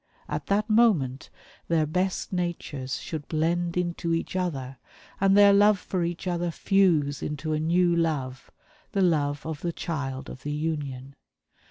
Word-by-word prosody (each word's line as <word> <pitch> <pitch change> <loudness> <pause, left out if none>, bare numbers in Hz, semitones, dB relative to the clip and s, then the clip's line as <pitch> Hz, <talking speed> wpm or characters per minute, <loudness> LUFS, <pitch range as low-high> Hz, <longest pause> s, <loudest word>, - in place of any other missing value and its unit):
At - - -4
that 205 +1 +1
moment 200 - +2 0.4
their 165 -2 +2
best 185 +5 -1
natures 160 -7 -3
should 155 -3 -6
blend 170 +2 0
into 170 -1 -1
each 165 - -4
other, 135 -8 -3 0.4
and 195 +1 +4
their 200 -1 +8
love 205 +1 +5
for 185 -1 -3
each 170 +2 -3
other 175 -1 -1
fuse 165 -6 +2
into 155 +1 -3
a 155 - 0
new 170 +2 +2
love 140 -6 -2 0.4
the 195 -2 +2
love 145 -4 +1
of 160 -2 -5
the 170 - -1
child 140 -6 -4
of - - -9
the 145 - -4
union. 145 -4 -3
165 Hz, 155 wpm, -26 LUFS, 145-180 Hz, 0.4 s, their